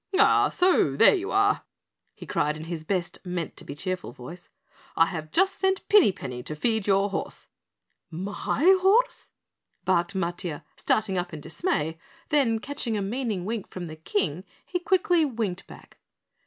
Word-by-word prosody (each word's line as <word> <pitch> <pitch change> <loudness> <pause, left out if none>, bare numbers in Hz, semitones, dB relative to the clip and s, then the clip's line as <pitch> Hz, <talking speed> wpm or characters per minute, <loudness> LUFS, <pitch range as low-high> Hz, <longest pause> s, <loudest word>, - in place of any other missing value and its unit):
"Ah, 425 - +5
so 355 - +3
there - - +7
you 385 -1 -2
are?" 405 +1 +2 0.5
he - - -10
cried 150 +1 0
in 155 - -7
his 165 -1 -5
best 180 +1 -3
meant 180 -4 -4
to - - -8
be 140 - -8
cheerful 185 -2 -4
voice. 130 +9 -11 0.5
"I 165 - +5
have 160 -3 -5
just 385 +2 +2
sent 380 0 0
Pinny 410 - +7
Penny 125 -8 -7
to 150 - -6
feed 220 +5 0
your 195 0 +3
horse." - - -4 0.6
"My 195 - -3 0.2
horse?" 460 +7 +2 0.6
barked 180 0 +1
Matiah, 170 -3 -3
starting 200 -4 0
up 175 -2 -4
in - - -7
dismay, 165 - -2 0.3
then 275 -7 +3
catching 240 -2 -3
a - - -1
meaning 215 -3 -2
wink 220 -1 -4
from 180 -1 -6
the 155 -2 -8
King, 165 +1 -2 0.2
he 360 - -2
quickly 360 -2 +2
winked 220 -9 -3
back. - - -15
195 Hz, 165 wpm, -26 LUFS, -, 0.6 s, there